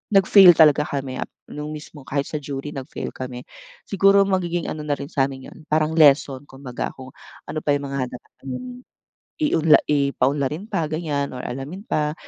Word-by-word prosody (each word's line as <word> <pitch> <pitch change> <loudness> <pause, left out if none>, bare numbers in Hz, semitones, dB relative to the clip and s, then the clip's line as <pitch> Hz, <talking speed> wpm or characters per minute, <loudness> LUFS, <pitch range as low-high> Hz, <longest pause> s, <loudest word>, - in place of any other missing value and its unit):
nag-fail 190 -2 +8
talaga 150 -2 +5
kami 135 -2 -4 0.3
nung 150 +1 -6
mismong 150 -2 -12
kahit 140 0 -1
sa 150 - -4
jury 140 0 -6
nag-fail 135 -3 -6
kami. 125 -1 -7 0.4
Siguro 195 0 +4
magiging 175 -3 -1
ano 155 - -5
na 145 - +1
rin 140 +3 -8
sa 135 -2 +2
amin 135 -1 -10
yun - - -14
parang 155 0 +1
lesson 145 -3 +4
kumbaga 135 -3 -6
kung 130 -1 -11 0.4
ano 155 - -3
pa 145 -1 +1
yung 145 - -3
mga 140 0 -4 0.2
kailangang 245 - -9 0.6
iunla 165 - +4
i 140 -2 +2
paunlarin 140 - -1
pa 165 - -1
ganyan 150 -3 -3
or 125 - -6
alamin 135 +11 -6
pa 150 0 0
150 Hz, 170 wpm, -22 LUFS, 135-160 Hz, 0.6 s, nag-fail